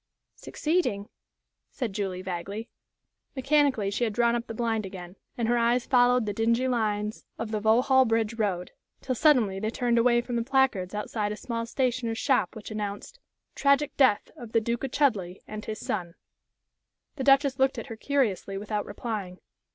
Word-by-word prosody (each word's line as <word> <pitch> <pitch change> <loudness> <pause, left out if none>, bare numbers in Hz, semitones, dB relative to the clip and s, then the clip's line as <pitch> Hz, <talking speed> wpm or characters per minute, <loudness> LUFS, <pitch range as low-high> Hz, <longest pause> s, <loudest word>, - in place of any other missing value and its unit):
'" - - -56
"Succeeding?" 300 - -1 0.6
said 240 -7 -4
Julie, 190 -2 -3
vaguely. 195 +5 -5 0.7
Mechanically 270 -6 +2
she 225 - -1
had 220 -3 0
drawn 235 +2 +3
up 235 0 -3
the - - -5
blind 225 -2 0
again, 185 -2 -8 0.2
and 235 -2 0
her 240 +1 +2
eyes 235 +1 +2
followed 245 -2 +4
the 205 - -2
dingy 230 +4 +1
lines 215 -3 -1
of 225 -1 -4
the 215 - -1
Vauxhall 250 +5 +4
Bridge 225 -1 +1
Road, 195 -6 -2 0.3
till 260 - -2
suddenly 245 -9 +3
they 215 +2 -1
turned 235 0 +1
away 240 0 +4
from 240 0 -3
the 230 - 0
placards 250 -8 +1
outside 210 0 -2
a - - -3
small 230 0 -4
stationer's 240 -2 -1
shop 260 +1 +1
which 220 0 -9
announced: 210 - -5 0.3
"Tragic 280 +1 +2
death 260 -7 +3
of 235 -2 -10
the 225 - +5
Duke 235 +3 -2
of 270 - -1
Chudleigh 205 -13 +1
and 215 0 -7
his 215 -1 -5
son." 175 -4 -4 1.0
The 265 - -2
Duchess 275 0 +4
looked 265 0 +2
at - - -5
her 230 - -7
curiously 220 -7 -1
without 210 +1 -3
replying. 205 -4 -5
230 Hz, 175 wpm, -27 LUFS, 210-255 Hz, 1.0 s, the